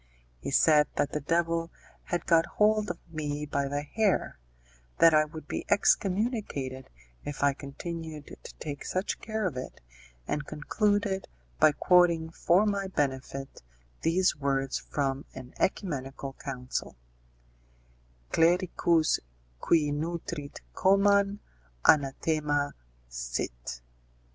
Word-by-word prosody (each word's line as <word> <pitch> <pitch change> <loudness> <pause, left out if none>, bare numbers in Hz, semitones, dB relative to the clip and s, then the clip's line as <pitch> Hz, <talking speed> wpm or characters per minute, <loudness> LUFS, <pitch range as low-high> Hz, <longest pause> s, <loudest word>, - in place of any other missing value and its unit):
He - - -5
said 150 +1 +5
that 145 - 0
the 150 - -1
devil 165 +2 0 0.4
had 175 - -2
got 165 -1 +4
hold 215 0 +3
of 175 - -3 0.2
me 150 -1 -3
by 140 -1 -1
the 145 +1 -2
hair, 200 - 0 0.6
that 165 -1 +7
I 155 0 +5
would 155 0 -10
be - - -3
excommunicated 195 - +1 0.3
if 145 -1 -4
I 140 -1 +4
continued 155 +2 -7 0.2
to - - -10
take 145 -2 -6
such 185 +3 -2
care 220 -1 -3
of 165 -8 -2
it, 130 - -7 0.5
and 150 -1 -2
concluded 200 +5 0 0.3
by 150 - +6
quoting 170 -1 +4
for 180 +5 +3
my 200 -2 0
benefit 135 -4 -3 0.4
these 180 +3 +2
words 135 -2 -1
from 135 -1 -2
an 130 -1 -9
œcumenical 135 -8 -2
council: 125 -2 -4 1.4
clericus 170 -1 +3 0.4
qui 150 - +2
nutrit 160 -1 -4
coman, 200 - +3 0.4
anathema 145 0 +2 0.3
sit. - - -5
155 Hz, 115 wpm, -29 LUFS, 140-180 Hz, 1.4 s, that